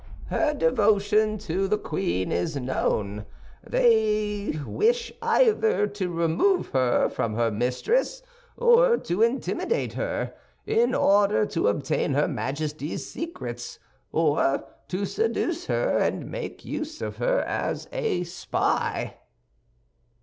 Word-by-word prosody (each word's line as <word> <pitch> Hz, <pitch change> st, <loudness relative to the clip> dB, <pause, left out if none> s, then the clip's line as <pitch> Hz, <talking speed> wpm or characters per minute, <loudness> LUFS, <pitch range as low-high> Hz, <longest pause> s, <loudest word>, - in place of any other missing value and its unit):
"Her 300 Hz, -1 st, +1 dB
devotion 215 Hz, -3 st, +2 dB
to 195 Hz, -1 st, -2 dB
the 210 Hz, +2 st, +1 dB
queen 95 Hz, -, -2 dB
is 115 Hz, -, -1 dB
known; 105 Hz, -6 st, -1 dB, 0.3 s
and -, -, -17 dB
they 210 Hz, -6 st, +2 dB
wish 465 Hz, -, +1 dB
either 450 Hz, -, +3 dB
to 200 Hz, -3 st, -3 dB
remove 170 Hz, -, +1 dB
her 130 Hz, -2 st, +2 dB
from 110 Hz, -2 st, -2 dB
her 115 Hz, 0 st, +1 dB
mistress, 130 Hz, -, 0 dB, 0.3 s
or 480 Hz, 0 st, +5 dB
to 180 Hz, -, -2 dB
intimidate 265 Hz, -, 0 dB
her, -, -, -3 dB, 0.3 s
in 445 Hz, +2 st, +2 dB
order 205 Hz, +1 st, +4 dB
to 165 Hz, -, 0 dB
obtain 135 Hz, +5 st, 0 dB
her 150 Hz, -, +3 dB
Majesty's 150 Hz, +2 st, -3 dB
secrets, 120 Hz, -, -6 dB, 0.3 s
or 150 Hz, -3 st, +2 dB, 0.2 s
to 185 Hz, +3 st, -2 dB
seduce 355 Hz, -, -1 dB
her -, -, +1 dB
and -, -, -1 dB
make -, -, -6 dB
use 310 Hz, +1 st, -5 dB
of -, -, -5 dB
her -, -, +1 dB
as -, -, -3 dB
a 465 Hz, -, -1 dB
spy." 175 Hz, +1 st, -2 dB
205 Hz, 120 wpm, -25 LUFS, -, 0.3 s, or